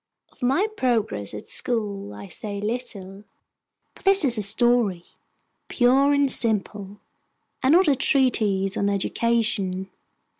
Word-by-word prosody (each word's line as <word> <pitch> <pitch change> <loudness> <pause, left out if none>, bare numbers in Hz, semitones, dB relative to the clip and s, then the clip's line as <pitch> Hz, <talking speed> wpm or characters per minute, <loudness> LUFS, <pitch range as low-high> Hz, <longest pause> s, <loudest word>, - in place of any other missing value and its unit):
Of - - -23
my 270 +11 +2
progress 230 - -2
at 105 - -9
school 205 - -3
I 105 0 -10
say 200 - -6
little; 205 -3 -6 0.7
for - - -18
this 390 -4 +3
is 245 -3 +4
a - - -1
story, 215 -3 +2 0.6
pure 265 +3 +3
and 285 -1 +2
simple, 205 -3 -1 0.6
and 265 +3 +3
not 360 +1 +5
a 290 - +5
treatise 215 -8 +1
on 200 - 0
education. 200 -2 -1
220 Hz, 125 wpm, -23 LUFS, 195-255 Hz, 0.7 s, not